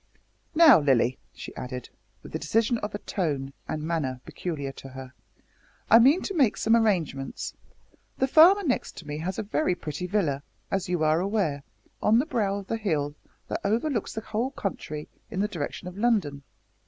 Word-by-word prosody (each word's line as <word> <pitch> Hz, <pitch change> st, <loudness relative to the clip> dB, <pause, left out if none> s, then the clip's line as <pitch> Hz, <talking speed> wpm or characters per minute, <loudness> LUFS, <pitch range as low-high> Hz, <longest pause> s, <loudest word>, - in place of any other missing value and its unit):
"Now, 315 Hz, -, +8 dB
Lilly," 130 Hz, -3 st, +2 dB
she -, -, -10 dB
added, 125 Hz, -1 st, -6 dB, 0.3 s
with -, -, -11 dB
the -, -, -3 dB
decision 225 Hz, +7 st, +1 dB
of 210 Hz, -1 st, -4 dB
tone 140 Hz, -7 st, -2 dB
and 155 Hz, -1 st, -3 dB
manner 155 Hz, -6 st, -2 dB
peculiar 145 Hz, -6 st, -4 dB
to 135 Hz, -, -11 dB
her, 130 Hz, 0 st, -9 dB, 0.8 s
"I 230 Hz, -, +10 dB
mean 275 Hz, +9 st, +5 dB
to 395 Hz, -, -3 dB
make 270 Hz, -, +3 dB
some 225 Hz, +1 st, +3 dB
arrangements. 175 Hz, -12 st, 0 dB, 0.6 s
The 265 Hz, -, +2 dB
farmer 350 Hz, +8 st, +7 dB
next 265 Hz, -7 st, -1 dB
to 170 Hz, -, -9 dB
me 150 Hz, +1 st, -4 dB
has 180 Hz, +4 st, -3 dB
a -, -, -2 dB
very 210 Hz, 0 st, 0 dB
pretty 155 Hz, +1 st, -5 dB
villa, 170 Hz, -9 st, 0 dB, 0.3 s
as 190 Hz, -2 st, -1 dB
you 175 Hz, -3 st, 0 dB
are 155 Hz, +1 st, +3 dB
aware, 185 Hz, -7 st, 0 dB, 0.4 s
on 220 Hz, +2 st, +4 dB
the 255 Hz, -, +3 dB
brow 215 Hz, -9 st, 0 dB
of 200 Hz, -, -7 dB
the 225 Hz, -, -2 dB
hill 155 Hz, -9 st, -1 dB, 0.3 s
that -, -, -3 dB
overlooks 225 Hz, +3 st, 0 dB
the 220 Hz, -, -4 dB
whole 225 Hz, +4 st, -2 dB
country 155 Hz, -, -5 dB, 0.2 s
in 185 Hz, -, -4 dB
the 205 Hz, -, +2 dB
direction 170 Hz, 0 st, -5 dB
of 180 Hz, -, -7 dB
London. 200 Hz, -12 st, +1 dB
185 Hz, 180 wpm, -27 LUFS, 150-225 Hz, 0.8 s, I